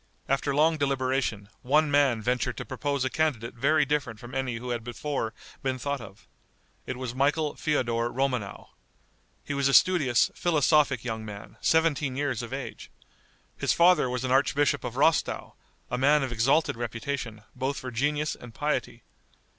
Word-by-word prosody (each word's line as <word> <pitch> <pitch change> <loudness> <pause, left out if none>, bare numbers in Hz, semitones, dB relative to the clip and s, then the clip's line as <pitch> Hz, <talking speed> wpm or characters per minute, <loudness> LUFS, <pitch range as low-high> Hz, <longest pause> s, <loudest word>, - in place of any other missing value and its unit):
After 135 +1 0
long 160 +2 +3
deliberation, 130 -6 0
one 150 +3 +2
man 135 -6 +3
ventured 125 +1 -1
to - - -5
propose 140 0 -2
a - - +1
candidate 140 -8 -1
very 140 +5 +2
different 130 -7 -2
from 120 +3 -11
any 130 -2 -2
who 125 +2 -5
had 120 -1 -3
before 120 0 -3 0.3
been 130 -1 -1
thought 140 +1 -3
of. 105 -2 -13 0.6
It 130 - -4
was 125 -2 -4
Michael 145 +3 +1
Feodor 120 -6 0
Romanow. 125 -6 -2 0.8
He 145 - -3
was 140 -1 +1
a 135 - +3
studious, 150 -10 +4
philosophic 150 -6 +2
young 110 -3 -4
man, 105 -1 -9
seventeen 155 -5 +2
years 135 -4 -1
of 120 0 -7
age. 135 0 -6 0.7
His - - +1
father 175 -6 +5
was 125 +1 -2
archbishop 140 +2 +2
of 120 - -5
Rostow, 150 +3 +1 0.4
a 125 - -1
man 145 +2 +4
of 130 - -3
exalted 125 +7 +2
reputation, 115 -1 -4
both 130 +2 -2
for 130 - -6
genius 150 +5 0
and 115 -3 -12
piety. 145 -5 -2
135 Hz, 160 wpm, -27 LUFS, 120-145 Hz, 0.8 s, father